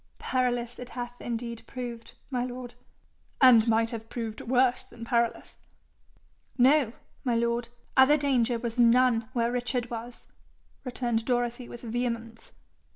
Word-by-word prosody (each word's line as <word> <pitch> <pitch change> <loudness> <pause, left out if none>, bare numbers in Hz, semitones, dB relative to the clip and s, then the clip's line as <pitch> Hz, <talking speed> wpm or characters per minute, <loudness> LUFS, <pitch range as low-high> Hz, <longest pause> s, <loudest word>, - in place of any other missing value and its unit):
'Perilous 245 -2 -1
it 250 0 -8
hath 245 0 -6
indeed 235 -1 -4
proved, 240 -3 -7 0.2
my 250 -2 0
lord.' 250 -1 -6 0.7
'And 240 -4 +7
might 225 0 +2
have 225 -1 -7
proved 225 -3 -5
worse 250 0 +2
than 230 - -10
perilous.' 235 -1 -1 1.0
'No, 260 -1 +4 0.3
my 245 -3 +1
lord. 235 0 0 0.3
Other 265 +3 +6
danger 250 -4 +1
was 235 0 -4
none 240 -1 +4
where 235 -2 +1
Richard 245 -1 -2
was,' 235 +1 -7 0.6
returned 240 -3 -1
Dorothy 245 0 -1
with 240 - -10
vehemence. 230 -1 -4
240 Hz, 130 wpm, -28 LUFS, 230-250 Hz, 1.0 s, And